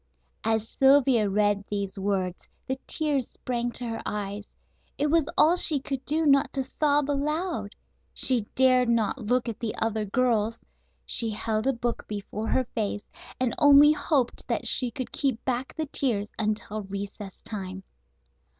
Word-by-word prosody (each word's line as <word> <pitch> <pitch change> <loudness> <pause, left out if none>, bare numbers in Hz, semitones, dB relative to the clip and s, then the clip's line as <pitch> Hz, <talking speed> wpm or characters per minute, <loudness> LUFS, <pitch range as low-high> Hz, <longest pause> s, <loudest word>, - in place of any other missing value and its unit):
As 225 0 0
Sylvia 265 -6 +4
read 205 0 +1
these 200 -1 -3
words 190 -2 -2 0.2
the 265 0 -3
tears 290 -5 -1
sprang 240 -1 -3
to 245 - -1
her 225 -1 -4
eyes. 205 0 -5 0.4
It 295 +1 +1
was 325 -3 +2
all 330 +3 +6
she 310 -5 +5
could 270 -1 -4
do 315 +2 0
not 275 -1 +4
to 270 - -1
sob 290 +2 +1
aloud. 290 - -2 0.4
She 240 -5 +2
dared 255 -2 +4
not 230 +2 +1
look 245 +3 0
at 230 -1 -4
the 230 -2 -3
other 220 -1 -1
girls. 230 0 +1 0.5
She 230 - 0
held 215 +2 -2
a - - +4
book 240 -1 -3
before 210 +1 -5
her 260 +2 +1
face, 210 -2 -2 0.3
and 255 -3 0
only 290 0 +8
hoped 285 -5 0
that - - -1
she 250 - +3
could 250 +2 -5
keep 265 -5 -1
back 255 0 -2
the 315 - -2
tears 230 -8 -1
until 215 0 -2
recess 200 0 -7
time. 190 -3 -5
235 Hz, 160 wpm, -26 LUFS, 210-275 Hz, 0.5 s, only